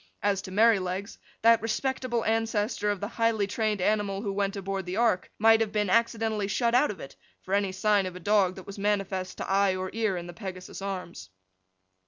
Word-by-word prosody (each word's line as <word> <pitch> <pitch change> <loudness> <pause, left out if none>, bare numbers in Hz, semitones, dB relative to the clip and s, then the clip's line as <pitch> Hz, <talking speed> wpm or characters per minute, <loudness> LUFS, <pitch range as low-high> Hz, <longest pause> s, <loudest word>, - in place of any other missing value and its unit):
As 200 -1 +1
to 185 - -9
Merrylegs, 200 -2 +1 0.2
that 230 0 +6
respectable 240 +1 -1
ancestor 220 -1 0
of 205 -2 -1
the 205 - -2
highly 230 -2 +1
trained 215 +1 -1
animal 205 0 0
who 200 -3 -2
went 200 0 -1
aboard 195 -1 -4
the 180 +3 -3
ark, 225 -6 +2
might 225 +1 +5
have 220 -2 0
been 210 -3 0
accidentally 225 -2 +1
shut 235 +3 0
out 255 +4 +4
of 195 - -6
it, 135 - -10 0.3
for 190 - -5
any 200 -1 +2
sign 200 0 +2
of 180 - -7
a - - -7
dog 190 0 +2
that 190 - -10
was 200 0 -9
manifest 195 -2 -1
to - - -5
eye 195 -1 +2
or 185 0 -4
ear 220 -4 0
in 175 - -5
the 175 - -9
Pegasus's 185 -1 -8
Arms. 180 - -6
205 Hz, 205 wpm, -27 LUFS, 190-220 Hz, 0.3 s, that